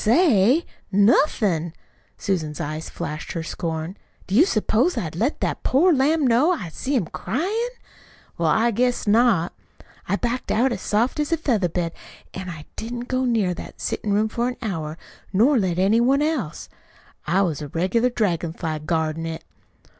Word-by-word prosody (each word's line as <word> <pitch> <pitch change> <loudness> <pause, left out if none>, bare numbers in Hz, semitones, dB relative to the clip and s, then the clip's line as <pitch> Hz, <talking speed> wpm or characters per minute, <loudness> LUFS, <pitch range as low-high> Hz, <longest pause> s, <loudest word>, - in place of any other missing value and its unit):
"Say? 250 - +4 0.3
Nothin'!" 200 - +3 0.4
Susan's 160 -6 -2
eyes 155 +2 -4
flashed 155 +1 -5
her 165 - -3
scorn. 165 +2 -4 0.3
"Do 190 - -6
you 300 - +6
s'pose 235 - +1
I'd 160 -2 -3
let 235 - -1
that - - -1
poor 330 +7 +4
lamb 295 +2 +2
know 255 +8 +4
I 180 - -5
see 265 - -3
him 225 -9 +1
cryin'? 400 - -2 0.7
Well, 165 -2 +1
I 225 +8 +3
guess 245 +3 0
not! 210 -5 +3 0.6
I 195 - +3
backed 240 +3 -2
out 250 +4 +3
as - - -3
soft 230 +8 0
as 300 +2 -1
a 330 - +3
feather 225 - +1
bed, 170 0 -2 0.4
an' 185 -1 -6
I 155 -3 -8
didn't 240 +2 -5
go 255 0 +1
near 220 -7 +1
that - - -10
settin' 210 - -2
room 210 +2 +2
for 235 +2 -1
an 250 - -4
hour, 160 -7 -3 0.3
nor 240 +8 +4
let 180 -4 0
any 200 +5 +3
one 270 +4 +3
else. 295 - -2 0.6
I 185 +5 +3
was 160 -5 -2
a 150 - -5
regular 185 - +1
dragon 180 -9 -1
fly 160 -3 -3
guardin' 160 +1 -1
it. 160 0 -6
210 Hz, 170 wpm, -23 LUFS, 170-250 Hz, 0.7 s, you